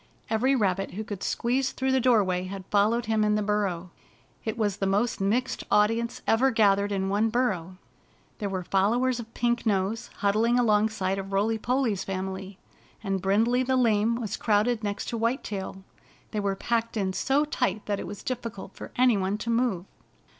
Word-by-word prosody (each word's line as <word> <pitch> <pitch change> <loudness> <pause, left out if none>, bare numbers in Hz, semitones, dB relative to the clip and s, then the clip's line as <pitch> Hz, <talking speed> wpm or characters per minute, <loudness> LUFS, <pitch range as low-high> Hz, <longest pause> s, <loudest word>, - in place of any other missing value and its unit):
Every 255 +5 +3
rabbit 195 -5 0
who 215 - -3
could 205 -3 -7
squeeze 255 +2 0
through 265 0 -1
the 265 - +3
doorway 200 -7 +2
had 190 0 -7
followed 215 +4 +2
him 220 0 +1
in 210 0 +2
the 210 - 0
burrow. 195 -4 -1 0.5
It 220 +1 -3
was 205 -3 0
the 195 - -1
most 205 +3 0
mixed 240 +7 0
audience 225 +3 +1
ever 255 +4 +3
gathered 205 -4 +3
in 190 -1 -1
one 205 +3 +1
burrow. 190 -7 -1 0.6
There 205 -3 -2
were 185 -1 -3
followers 235 +7 +1
of 230 -1 -8
Pink 240 0 0
Nose 205 +1 0
huddling 220 +4 +2
alongside 210 -4 +2
of 195 0 -6
Roily 215 +3 +1
Polly's 240 -5 0
family, 190 0 -5 0.5
and 195 -2 -1
Brindley 225 +6 +2
the 260 0 +1
Lame 225 -2 +3
was 220 -3 -3
crowded 220 +1 +1
next 205 -1 -3
to 235 - -3
White 230 +4 0
Tail. 190 -1 -5 0.5
They 210 - -2
were 200 -1 0
packed 230 +2 -1
in 190 -2 0
so 275 +8 +1
tight 215 -8 -1
that 205 -1 -1
it - - -5
was 205 -1 -8
difficult 230 -6 -5
for - - -8
any 250 -3 +4
one 195 +1 -1
to 230 +2 -3
move. 230 -7 0
210 Hz, 180 wpm, -27 LUFS, 195-235 Hz, 0.6 s, any